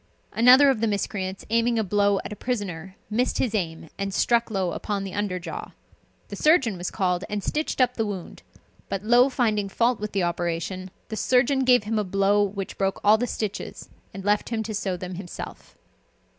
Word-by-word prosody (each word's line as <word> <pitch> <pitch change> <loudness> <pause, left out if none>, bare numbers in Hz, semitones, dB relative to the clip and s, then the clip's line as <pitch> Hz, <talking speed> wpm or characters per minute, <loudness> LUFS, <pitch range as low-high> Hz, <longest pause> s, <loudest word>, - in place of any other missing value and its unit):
Another 255 +4 +7
of 230 -5 -2
the 225 - +2
miscreants, 200 -2 -3
aiming 230 +1 +2
a 220 - +2
blow 200 0 +2
at - - -5
a - - -7
prisoner, 195 -7 -4 0.2
missed 245 +4 +1
his 235 -4 0
aim, 165 -6 -2
and 195 0 -2
struck 235 +4 +2
Low 190 -4 -1
upon 200 +2 -3
the 195 -2 -6
under 205 -3 -1
jaw. 180 - -7 0.6
The - - -6
surgeon 275 - +3
was 175 0 -4
called, 180 -1 0
and 205 -1 -3
stitched 305 -1 -2
up 250 -1 +3
the 225 -3 -1
wound; 190 -4 -6 0.5
but 195 0 -3
Low 240 +4 +5
finding 215 -6 0
fault 235 +4 +1
with 210 0 -5
the 195 -2 +1
operation, 175 +2 -2 0.2
the 220 - -4
surgeon 255 +5 +2
gave 250 -3 +5
him 215 +1 -1
a - - +1
blow 195 +2 +2
which 195 -1 -3
broke 195 -1 0
all 215 +1 +6
the 245 - 0
stiches, 215 -3 -5 0.2
and 195 -1 -8
left 205 0 +1
him 225 -2 -1
to 220 0 -5
sew 195 -3 -2
them 180 +1 -6
himself. 175 - -9
205 Hz, 200 wpm, -25 LUFS, 190-230 Hz, 0.6 s, Another